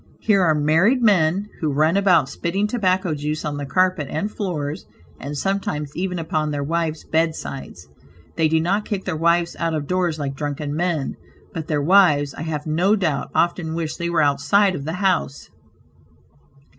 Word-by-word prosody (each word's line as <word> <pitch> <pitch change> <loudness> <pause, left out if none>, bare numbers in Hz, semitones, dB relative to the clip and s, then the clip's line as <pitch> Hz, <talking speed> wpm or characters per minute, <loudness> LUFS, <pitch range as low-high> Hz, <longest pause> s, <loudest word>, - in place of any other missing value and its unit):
Here 200 -3 +3
are 160 -4 +3
married 165 - +3
men 190 -2 +3
who 155 -3 0
run 155 +5 +2
about 180 -8 +4
spitting 170 +8 -2
tobacco 190 -6 0
juice 150 +1 -3
on 145 -1 -3
the 145 -1 -5
carpet 185 -2 +1
and 205 +7 -2
floors, 155 - -4 0.3
and 145 +2 -5
sometimes 150 -6 -2
even 180 0 -2
upon 155 -2 -1
their 145 -1 -2
wives 160 +1 -2
besides. 160 - -3 0.5
They 160 -1 +2
do 160 +1 +2
not 195 +6 0
kick 205 -3 -4
their 180 - -2
wives 170 +2 +1
out 165 -1 0
of 150 -2 -3
doors 175 -1 0
like 140 -2 -3
drunken 145 +1 -4
men, 165 -4 -1 0.4
but 160 -2 -5
their 150 -3 0
wives, 150 -5 +4
I - - -8
have 155 -2 -4
no 175 +7 +2
doubt, 160 -9 -1
often 170 -2 0
wish 160 -2 -3
they 170 0 -2
were 165 -2 +2
outside 145 +8 +3
of 140 -5 -5
the 160 - -3
house. 175 -7 -1
160 Hz, 175 wpm, -21 LUFS, 150-185 Hz, 0.5 s, about